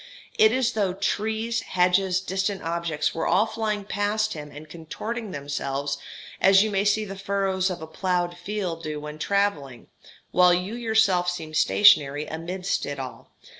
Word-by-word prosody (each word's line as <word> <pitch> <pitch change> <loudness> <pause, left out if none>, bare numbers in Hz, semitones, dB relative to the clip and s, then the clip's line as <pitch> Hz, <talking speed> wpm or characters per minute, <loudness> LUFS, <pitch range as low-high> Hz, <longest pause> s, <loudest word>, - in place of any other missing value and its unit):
It 220 0 +7
is 255 0 +1
as - - -6
though 200 -4 0
trees, 220 +4 -1
hedges, 185 +1 +2
distant 190 +1 -2
objects, 165 -2 -1
were 165 - -2
all 215 - +4
flying 215 -2 -3
past 210 +2 -1
him 150 -2 -8
and 150 +2 -11
contorting 210 +8 -6
themselves 140 -2 -3 0.4
as 195 +1 +6
you 215 - -2
may 195 -1 +1
see 215 +1 +2
the 195 -1 -7
furrows 195 -1 0
of 175 -3 -5
a - - -7
ploughed 175 +1 -1
field 180 -2 -4
do 155 -2 -4
when 150 +1 -8
travelling, 155 - -1 0.4
while 180 -1 +5
you 180 +4 -3
yourself 220 -6 +2
seem 165 -3 -5
stationary 150 -4 +4
amidst 180 +4 -3
it 145 - -4
all. 130 -2 -8
185 Hz, 165 wpm, -25 LUFS, 160-205 Hz, 0.4 s, It